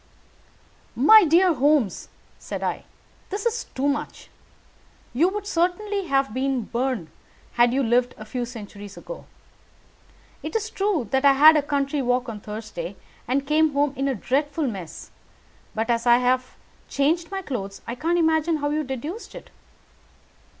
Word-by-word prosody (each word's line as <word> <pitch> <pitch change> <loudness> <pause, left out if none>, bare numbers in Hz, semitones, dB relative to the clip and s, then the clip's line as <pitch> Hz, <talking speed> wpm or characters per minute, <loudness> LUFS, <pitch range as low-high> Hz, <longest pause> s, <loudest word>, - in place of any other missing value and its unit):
"My 435 -3 +7
dear 345 +3 +4
Holmes," 280 - +1 0.3
said - - -6
I, - - -3 0.4
"this 400 +2 -4
is 470 0 -1
too 270 +2 0
much. 285 +1 -3 0.8
You 320 +9 +3
would 410 +1 -5
certainly 395 +2 -1
have 270 -5 +1
been 260 -1 -1
burned 240 -7 -2 0.4
had 240 0 +4
you 270 +2 +1
lived 245 +1 +1
a 215 - -9
few 245 +3 -3
centuries 205 -4 -10
ago. - - -9 1.2
It - - -6
is 445 0 -1
true 390 - 0
that 265 +1 +1
I 280 -1 +7
had 305 +4 +8
a 300 - +4
country 285 0 -1
walk 250 0 0
on 215 -2 -6
Thursday 210 -4 -7 0.3
and 270 +3 0
came 305 +1 +2
home 285 0 +1
in 275 +1 -1
a 270 - 0
dreadful 290 +7 -1
mess; 190 - -6 0.6
but 225 +2 0
as 235 +1 0
I 240 0 +7
have 255 +1 0 0.3
changed 325 +5 +1
my 390 -1 -4
clothes, 200 - -5
I 235 - -4
can't 330 +7 0
imagine 320 -1 +2
how 290 0 -2
you 305 +1 0
deduce 290 - -6
it. - - -11
275 Hz, 155 wpm, -24 LUFS, 240-325 Hz, 1.2 s, had